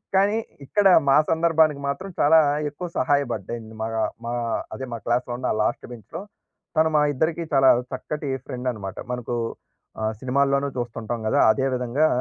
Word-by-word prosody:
కానీ 200 +3 +3 0.3
ఇక్కడ 205 +7 +3 0.2
మా 135 - +6
సందర్భానికి 160 -3 +3
మాత్రం 140 +8 -3
చాలా 160 +3 +6 0.3
ఎక్కువ 165 +5 -6
సహాయపడ్డింది 120 -4 -1
మా 110 - -1 0.4
మా 120 - -3 0.4
అదే 130 - -5
మా - - -3
క్లాస్‌లో 120 +1 0
ఉన్న 130 - -1
లాస్ట్ 115 - -1
బెంచ్‌లో. 120 - -8 0.6
తను 160 0 +4
మా - - +4
ఇద్దరికి 160 +4 0
చాలా 135 -1 +6 0.2
చక్కటి 145 +3 -4 0.2
ఫ్రెండనమాట 125 -6 -4 0.2
మనకు 125 -1 -3 0.7
ఆహ్, 110 0 0
సినిమాల్లోనూ 140 +2 +1
చూస్తుంటాం 120 -1 -4
గదా! - - +3
అదే 130 +5 0
విధంగా 125 +5 +1
135 Hz, 145 wpm, -24 LUFS, 120-155 Hz, 0.7 s, మా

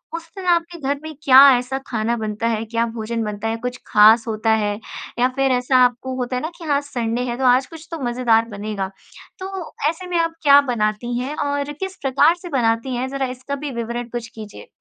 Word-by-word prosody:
उस 335 0 -7
दिन 380 - -6
आपके 340 0 +1
घर 280 0 -2
में 315 0 -7
क्या 265 -3 +8 0.2
ऐसा 250 +2 -3
खाना 230 0 -1
बनता 215 0 -2
है, 225 -1 -1
क्या 230 +1 0
भोजन 230 0 -3
बनता 210 0 -4
है? 225 +1 -1
कुछ 250 0 -3
खास 220 +2 +6
होता 220 0 -1
है? 205 -1 -1 0.4
या 250 - +4
फिर 270 -1 +2
ऐसा 250 +1 +2
आपको 250 +1 -2
होता 250 0 -2
है 250 - -1
ना 315 - -3
कि 345 - -11
हाँ, 285 -2 +2
संडे 240 -4 -3
है, 240 - -3
तो 265 - -3
आज 255 +1 +4
कुछ 325 0 -12
तो 330 - -4
मज़ेदार 240 -2 +2
बनेगा। 205 -2 -4 0.5
तो 375 -2 -6 0.2
ऐसे 335 +3 -6
में 355 -1 -1
आप 330 0 0
क्या 285 -1 +7
बनाती 225 +1 -1
हैं 270 +4 -4
और 285 -1 -2
किस 380 +5 -6
प्रकार 275 +5 +3
से 355 - -8
बनाती 245 -2 0
हैं? 250 +2 -2
ज़रा 275 0 -2
इसका 270 +3 -5
भी 285 - -3
विवरण 235 +1 -5
कुछ 235 -1 -5
कीजिए। 215 -2 -10
250 Hz, 220 wpm, -21 LUFS, 225-285 Hz, 0.5 s, क्या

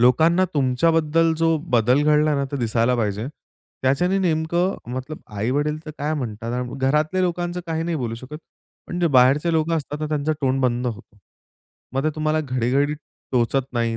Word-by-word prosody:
लोकांना 160 +9 +4
तुमच्याबद्दल 160 +4 +2
जो 165 0 +3
बदल 125 +4 +3
घडला 150 0 +3
ना, 140 0 0
तो 140 +1 -5
दिसायला 115 0 +1
पाहिजे. 105 0 -1 0.6
त्याच्याने 175 +9 +2
नेमकं 170 +1 +1 0.2
मतलब 130 +4 -5 0.2
आई-वडील 145 +8 0
तर - - -5
काय 150 +2 -1
म्हणतात. 115 -4 -4
अन 125 0 -3
घरातल्या 150 +7 +1
लोकांचं 175 0 -1
काही 160 -1 -2
नाही 165 -1 -1
बोलू 120 -4 -3
शकत. 130 +6 -9 0.5
पण 175 - -4
जे 175 - +3
बाहेरचे 140 +7 +4
लोकं 160 +1 +1
असतात 145 -1 -4
तर 155 - -1
त्यांचा 150 0 0
तोंड 135 -1 +1
बंद 125 0 +1
होतो. 110 -2 -7 0.7
मग 135 +2 -1
ते 155 - +2
तुम्हाला 155 0 0
घडी-घडी 135 +1 0 0.4
टोचत 130 +2 +1
नाही. 115 -1 0
145 Hz, 170 wpm, -22 LUFS, 125-160 Hz, 0.7 s, लोकांना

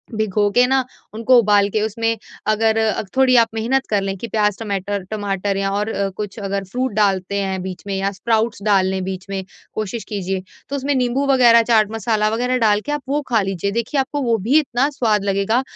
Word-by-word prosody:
भिगोके 215 +2 +2
न 265 0 +2 0.3
उनको 230 +3 +4
उबाल 205 -2 +4
के 215 +1 -1
उसमें 225 +1 -1 0.3
अगर 220 +1 +2
अ, 220 -1 +1 0.2
थोड़ी 260 -1 +5
आप 230 -1 +5
मेहनत 245 +4 0
कर 205 -2 +1
लें 195 0 -3
कि 235 - -6
प्याज, 210 -2 +1
टमैटर 200 -2 -3
टमाटर 200 -2 -2
या 195 0 -1
और 205 +2 -1
अ, 200 -2 -1
कुछ 210 0 -5
अगर 200 -1 -3
फ्रूट 250 +5 -2
डालते 200 -2 +1
हैं 190 -1 -2
बीच 185 -1 -7
में 195 - -2
या 195 +1 -1
स्प्राउट्स 220 +1 -1
डाल 200 -3 +3
लें 190 0 -2
बीच 190 0 -5
में 195 -1 -3 0.3
कोशिश 215 +1 -4
कीजिए। 190 -2 -3 0.3
तो 280 - -3
उसमें 280 +1 -1
नींबू 255 +2 0
वगैरह 245 -4 +6
चाट 220 -2 +3
मसाला 215 -1 0
वग़ैरह 250 +3 0
डाल 210 -3 +3
के 295 - -3
आप 295 - -2
वो 295 +1 +1
खा 225 -3 +3
लीजिए। 195 0 -2
देखिए, 235 +5 -1
आपको 285 +2 -1
वो 230 -3 +1
भी 235 +10 +2
इतना 270 -1 0
स्वाद 220 -8 0
लगेगा। 200 +5 +1
215 Hz, 210 wpm, -20 LUFS, 195-235 Hz, 0.3 s, वगैरह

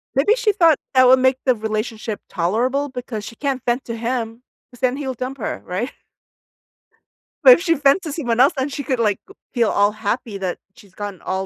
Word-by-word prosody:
Maybe 315 - +4
she 475 -4 +2
thought 335 -7 +4 0.2
that 255 -1 +6
would 260 +1 +6
make 260 0 +3
the 255 -2 +4
relationship 215 0 -4
tolerable 245 +11 0
because 245 -4 -6
she 230 - -9
can't 270 -2 -2
vent 245 +2 0
to 230 - -5
him, 230 0 -3 0.3
'cause 245 - -17
then 255 0 +1
he'll 270 -3 -3
dump 255 +3 -5
her, 225 - -4
right? 195 +9 -3 1.5
But - - +10
if 345 - +1
she 335 -3 +2
vent 285 +5 +3
to 310 - -5
someone 245 -7 -2
else, 270 +3 +5
then 265 +2 -1
she 285 0 -5
could, 260 -3 -1
like, 210 -3 +1
g 395 - -14 0.2
feel 235 -4 +2
all 205 +1 +3
happy 215 0 -3
that 185 -2 -3 0.2
she's 200 -3 -19
gotten 205 -2 -7
all 190 +1 -3
250 Hz, 210 wpm, -20 LUFS, 215-275 Hz, 1.5 s, But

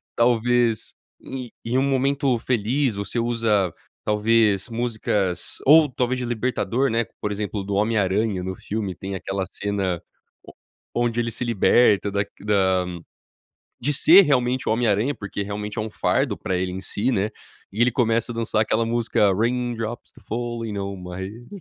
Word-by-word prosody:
talvez, 120 -1 +2 0.3
e 130 -2 -7 0.2
em 120 +3 0
um 135 - +3
momento 135 -1 +1
feliz 125 +2 0
você 100 +3 -4
usa, 115 -6 +1 0.3
talvez, 105 -1 +2
músicas 110 -6 -1
ou 150 +1 +7
talvez 125 0 -1
de 125 - -3
Libertador 120 +1 0
né 115 +1 +1 0.2
por 105 - -2
exemplo 105 0 -3
do 100 +1 -4
O - - +1
Homem 110 +2 +1
Aranha 100 0 +1
no 95 0 -4
filme 105 -2 -4
tem 95 +2 -6
aquela 95 +1 -3
cena 100 -4 -2 0.4
o - - -13 0.5
onde 120 0 -1
ele 115 0 -2
se 125 +2 -3
liberta 105 -2 +3
da 100 0 0 0.2
da 95 -3 +2 1.0
de 145 +4 +1
ser 170 +7 +8
realmente 130 -5 +1
O - - +3
Homem 120 +2 +1
Aranha 110 +8 +1
porque 100 -2 -5
realmente 105 +2 -5
é - - +1
um 110 - -4
fardo - - 0
pra 95 - -3
ele 90 0 -1
em 95 - -5
si, 105 +6 -1
né, 105 -1 0 0.4
e 105 - -5
ele 125 - +4
começa 115 0 +1
a - - -9
dançar 115 -1 0
aquela 110 +1 +1
música, 115 -3 +2
Raindrops 120 +1 -2
Keep 110 -6 -20
Falling 115 -2 -3
on 100 0 -4
my 90 -1 -8
Head, 105 +6 -7
110 Hz, 170 wpm, -23 LUFS, 100-120 Hz, 1.0 s, ser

